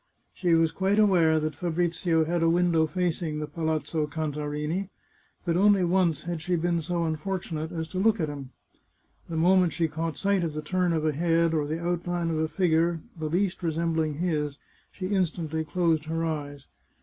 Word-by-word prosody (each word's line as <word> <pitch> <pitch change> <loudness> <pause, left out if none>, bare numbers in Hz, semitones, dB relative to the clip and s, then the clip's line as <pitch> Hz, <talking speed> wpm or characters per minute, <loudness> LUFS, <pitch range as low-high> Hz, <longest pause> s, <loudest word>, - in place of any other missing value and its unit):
She 175 -3 +2
was 165 -1 +3
quite 195 +4 +1
aware 175 -7 +4
that 155 0 -2
Fabrizio 165 0 0
had 170 +1 0
a 165 - +4
window 170 -2 +3
facing 170 -2 -1
the 150 - -2
Palazzo 160 -1 -2
Cantarini, 150 +4 -3 0.6
but 170 -2 +1
only 200 0 +4
once 175 -3 +2
had 170 -2 -4
she 175 +3 0
been 170 0 0
so 170 +1 -1
unfor 165 +4 -2
tunate 160 -2 -5
as 160 -2 -4
to 185 - -3
look 220 +2 +3
at 160 - 0
him. 140 -3 -7 0.8
The 165 - -3
moment 180 0 +4
she 165 +1 +1
caught 160 0 -4
sight 200 -2 +1
of 160 -2 -2
the 155 0 -4
turn 180 +2 +1
of 160 -2 0
a 155 - +3
head 165 +2 +2
or 150 -2 0
the 160 +2 -2
outline 175 0 -1
of 160 - -1
a 160 - +1
figure 165 0 +1 0.2
the 155 -2 -4
least 185 +3 0
re 170 -2 0
sembling 160 -2 0
his, 150 -4 -1 0.3
she 185 - -6
instantly 165 -5 -1
closed 160 -1 +1
her 165 +1 -1
eyes. 145 -3 -4
165 Hz, 190 wpm, -27 LUFS, 155-175 Hz, 0.8 s, aware